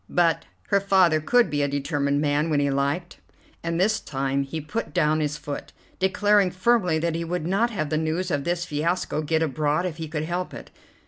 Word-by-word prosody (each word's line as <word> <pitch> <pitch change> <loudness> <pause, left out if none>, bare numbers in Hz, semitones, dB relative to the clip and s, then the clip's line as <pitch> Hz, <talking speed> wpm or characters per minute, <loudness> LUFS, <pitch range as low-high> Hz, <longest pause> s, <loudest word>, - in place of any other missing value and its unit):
But 170 -2 +2 0.2
her 200 - +4
father 185 -5 +4
could 240 +9 +3
be 145 -1 0
a 145 - +2
determined 140 0 0
man 150 +2 +1
when 150 -2 +2
he 140 -1 +1
liked, 140 +6 -1 0.4
and 165 0 -2
this 215 +4 +2
time 135 -3 -1
he 140 +4 -4
put 185 +10 -5
down 155 -2 +3
his 150 -1 -1
foot, 145 -1 -7 0.3
declaring 200 +1 +3
firmly 185 -3 +2
that 165 +1 0
he 165 +1 -2
would 170 -1 -3
not 200 +7 +2
have 155 -10 -3
the 155 - +1
news 165 +3 -1
of 145 -2 0
this 175 +2 -1
fiasco 155 +1 -1
get 160 +1 +1
abroad 150 +3 0
if 175 -4 -4
he 160 -1 -5
could 155 0 -3
help 175 +3 -3
it. - - -10
160 Hz, 205 wpm, -25 LUFS, 150-180 Hz, 0.4 s, her